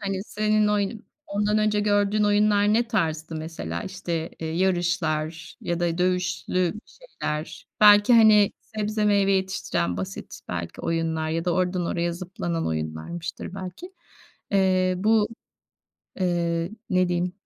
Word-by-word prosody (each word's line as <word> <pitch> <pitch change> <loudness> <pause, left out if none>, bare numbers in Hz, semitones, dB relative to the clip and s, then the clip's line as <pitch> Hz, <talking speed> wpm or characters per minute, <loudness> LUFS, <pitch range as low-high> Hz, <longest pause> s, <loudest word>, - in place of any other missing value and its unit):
Hani, 195 -2 -2
senin 215 0 +1
oy 205 -1 +1 0.3
ondan 210 +1 +1
önce 210 -1 +2
gördüğün 205 0 +2
oyunlar 205 0 +3
ne 235 +2 +2
tarzdı 160 -7 -1
mesela? 155 - -5
İşte, 170 -3 -4
eee, 160 - -3
yarışlar 170 -4 -1
ya 170 0 -2
da 170 -1 0
dövüşlü 180 0 0
şeyler. 160 - -6
Belki, 205 +2 +7
hani, 215 -3 +6
sebze 215 -1 -2
meyve 200 -1 +3
yetiştiren 190 - -1
basit, 95 +1 -6
belki, 85 -1 -5
oyunlar 160 -1 -1
ya 165 +1 -1
da 180 - +1
oradan 180 0 0
oraya 170 0 -1
zıplanan 175 -1 -4
oyunlarmıştır 80 - -5
belki. 195 - -8 0.6
Eee, 185 -2 +3
bu, 215 +2 +3 0.9
eee, 170 -1 0 0.2
ne 185 -1 +3
diyeyim? 175 0 -1
185 Hz, 125 wpm, -25 LUFS, 165-205 Hz, 0.9 s, Belki